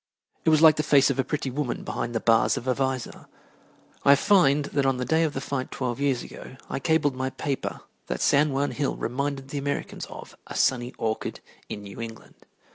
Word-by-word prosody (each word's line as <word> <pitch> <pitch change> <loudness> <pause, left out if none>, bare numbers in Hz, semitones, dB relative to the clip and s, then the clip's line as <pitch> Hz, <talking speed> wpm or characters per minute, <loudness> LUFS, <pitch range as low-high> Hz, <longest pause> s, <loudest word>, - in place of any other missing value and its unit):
It - - +5
was 155 0 +4
like 155 -1 +8
the - - +2
face 145 -2 +4
of 135 - -3
a - - +4
pretty 140 0 -3
woman 135 -2 -3
behind 120 - -4
the - - +2
bars 115 0 +3
of 125 - -5
a 130 - +3
visor. 130 -1 -3 0.8
I 140 - +7
find 150 -5 +4
that 140 - +2
on 135 -1 +2
the 125 - -2
day 160 +6 +2
of 155 -3 0
the 135 - -2
fight 135 -1 -3
twelve 125 -1 -3
years 140 -3 +1
ago 130 - -11
I - - -2
cabled 145 0 +2
my 130 +1 -2
paper 135 +1 -4 0.3
that - - -3
San 145 +1 +3
Juan 140 +1 0
Hill 145 -2 -1
reminded 135 +2 -3
the 145 - -3
Americans 140 0 -3
of - - -10
"a - - -8
sunny 125 -1 +1
orchard 110 -1 -2 0.3
in 105 - -6
New 100 +3 -8
England." 115 -1 -8
135 Hz, 210 wpm, -26 LUFS, 125-145 Hz, 0.8 s, like